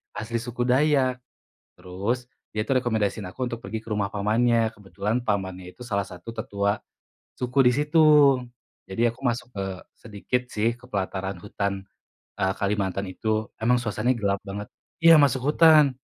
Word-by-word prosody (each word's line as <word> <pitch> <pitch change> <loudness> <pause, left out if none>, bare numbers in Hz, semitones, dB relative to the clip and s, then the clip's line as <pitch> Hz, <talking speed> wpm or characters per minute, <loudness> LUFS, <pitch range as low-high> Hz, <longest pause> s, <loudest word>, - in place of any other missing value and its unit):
asli 115 +2 -3
suku 120 0 -3
Dayak, 130 0 +2 0.6
terus 100 +8 -3 0.2
dia 105 +1 -3
itu - - -1
rekomendasiin 110 -4 0
aku 130 +3 -3
untuk 120 0 -6
pergi 110 -2 -4
ke 110 - -21
rumah 100 -1 -1
pamannya, 115 +2 +1
kebetulan 105 +4 -3
pamannya 95 -4 -3
itu 125 +5 -11
salah 100 -3 0
satu 95 +5 -10
tetua 100 -2 -1 0.6
suku 125 +2 -1
di - - +6
situ, 150 +3 +1 0.9
jadi 115 +5 +1
aku - - -22
masuk 120 -1 -1
ke 100 - -2 0.3
sedikit 110 +3 -3
sih 110 +2 +1
ke - - -27
pelataran 95 -1 -3
hutan, 100 0 -2 0.7
eee, 95 0 +1
Kalimantan 100 -1 -1
itu, 100 - -8 0.3
emang 120 +3 +3
suasananya 120 +3 0
gelap 100 -1 +1
banget. 100 +1 -5 0.4
Iya, 165 0 +9
masuk 135 -3 +3
hutan. 155 -5 +6
110 Hz, 155 wpm, -25 LUFS, 100-125 Hz, 0.9 s, Iya